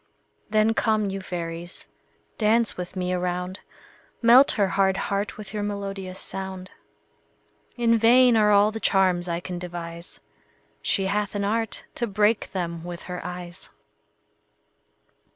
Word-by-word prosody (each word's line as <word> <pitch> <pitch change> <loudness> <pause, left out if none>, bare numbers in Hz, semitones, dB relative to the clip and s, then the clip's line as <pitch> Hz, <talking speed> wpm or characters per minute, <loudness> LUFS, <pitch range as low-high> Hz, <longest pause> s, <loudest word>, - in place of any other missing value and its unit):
Then 215 +1 +3
come, 215 -3 +1
you 195 0 -4
fairies, 170 -1 -6 0.5
dance 225 +1 +3
with 180 +1 -6
me 180 -1 -2
a 180 - 0
round; 180 +1 -3 0.6
Melt 245 +4 +7
her 200 -2 +1
hard 190 +1 +2
heart 200 +1 -2
with 210 -1 -9
your 210 - -2
melodious 195 -2 -5
sound. 190 -1 -4 1.1
In 230 -1 +3
vain 245 +2 +6
are 210 -1 +4
all 205 +1 +5
the 225 - -5
charms 185 -4 +2
I 170 -1 -1
can 175 0 -6
devise; 170 -1 -7 0.6
She 195 - +1
hath 205 +1 -1
an 200 - -1
art 225 +2 -1
to 240 - -1
break 210 +1 +1
them 170 -3 -4
with 175 -1 -7
her 180 -1 -6
eyes. 180 0 -7
195 Hz, 140 wpm, -25 LUFS, 180-215 Hz, 1.1 s, Melt